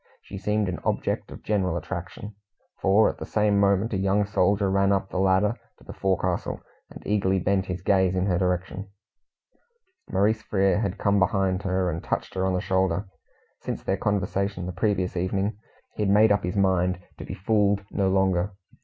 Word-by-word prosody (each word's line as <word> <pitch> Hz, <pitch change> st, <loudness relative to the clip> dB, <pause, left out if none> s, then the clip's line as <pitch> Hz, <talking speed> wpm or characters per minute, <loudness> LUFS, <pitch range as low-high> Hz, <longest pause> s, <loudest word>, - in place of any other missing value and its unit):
She 95 Hz, -, -8 dB
seemed 105 Hz, +1 st, 0 dB
an 90 Hz, -1 st, -3 dB
object -, -, -1 dB
of -, -, -11 dB
general 95 Hz, -5 st, 0 dB
attraction, 90 Hz, +5 st, -6 dB, 0.5 s
for 100 Hz, +3 st, +4 dB
at -, -, -3 dB
the -, -, -5 dB
same 105 Hz, -1 st, +2 dB
moment 100 Hz, +3 st, +2 dB
a -, -, +1 dB
young 100 Hz, +2 st, +2 dB
soldier 100 Hz, 0 st, +2 dB
ran 100 Hz, 0 st, +3 dB
up 95 Hz, -1 st, 0 dB
the 90 Hz, -, -2 dB
ladder 95 Hz, +3 st, +3 dB, 0.2 s
to -, -, -20 dB
the -, -, -9 dB
forecastle, 95 Hz, -2 st, -1 dB, 0.3 s
and -, -, -12 dB
eagerly 95 Hz, -2 st, +1 dB
bent 95 Hz, +1 st, 0 dB
his 90 Hz, -1 st, -5 dB
gaze 95 Hz, -2 st, +2 dB
in 90 Hz, 0 st, +1 dB
her 90 Hz, -3 st, +1 dB
direction. 95 Hz, +2 st, -2 dB, 1.2 s
Maurice 110 Hz, +3 st, +1 dB
Frere 100 Hz, -1 st, +1 dB
had 100 Hz, -2 st, -2 dB
come 100 Hz, 0 st, +2 dB
behind 95 Hz, -1 st, +1 dB
her 95 Hz, -1 st, 0 dB
and 80 Hz, -, -5 dB
touched -, -, -3 dB
her 95 Hz, 0 st, 0 dB
on 95 Hz, -, 0 dB
the 90 Hz, -, 0 dB
shoulder. 95 Hz, 0 st, 0 dB, 0.5 s
Since -, -, -5 dB
their -, -, 0 dB
conversation 100 Hz, -2 st, -1 dB
the 90 Hz, -, -4 dB
previous 95 Hz, 0 st, -1 dB
evening, 95 Hz, +4 st, -1 dB, 0.4 s
he -, -, -4 dB
had 105 Hz, -, +1 dB
made 105 Hz, +2 st, +5 dB
up 100 Hz, 0 st, +2 dB
his 90 Hz, +2 st, -3 dB
mind 90 Hz, -2 st, +2 dB, 0.2 s
to -, -, -6 dB
be -, -, -6 dB
fooled 100 Hz, 0 st, +1 dB
no 95 Hz, -2 st, +1 dB
longer. 95 Hz, 0 st, +1 dB
95 Hz, 190 wpm, -25 LUFS, 95-100 Hz, 1.2 s, made